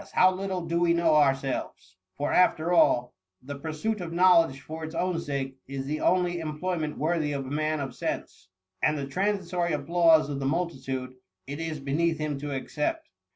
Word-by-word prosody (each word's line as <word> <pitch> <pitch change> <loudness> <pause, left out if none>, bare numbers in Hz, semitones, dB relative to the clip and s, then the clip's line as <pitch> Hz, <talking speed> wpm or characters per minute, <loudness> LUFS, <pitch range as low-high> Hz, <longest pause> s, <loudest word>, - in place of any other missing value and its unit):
how 185 0 +6
little 185 -2 -3
do 170 +1 0
we 170 -1 +3
know 170 -2 +3
ourselves, 135 -9 0 0.2
for 145 - -1
after 175 -1 +3
all, 125 -7 +4 0.3
the 140 +1 -7
pursuit 165 +8 -3
of 170 -2 -5
knowledge 170 -5 +4
for 160 +2 -8
its 160 +1 -6
own 180 -1 0
sake 135 -3 -4
is 135 0 -5
the 150 +2 -3
only 180 -1 +2
employment 155 0 -3
worthy 155 -1 0
of 135 -1 -3
a 130 - -7
man 155 +1 0
of 135 -3 -4
sense: 95 -5 -5 0.3
and 155 0 +2
the 140 - -3
transitory 180 +1 -1
applause 160 +1 +4
of 140 -2 -4
the 135 - -3
multitude, 135 -5 -2 0.3
it 145 +3 -6
is 160 -2 -3
beneath 155 +4 0
him 155 -1 -2
to 145 0 -5
accept. 140 +2 -3
155 Hz, 180 wpm, -27 LUFS, 140-170 Hz, 0.3 s, how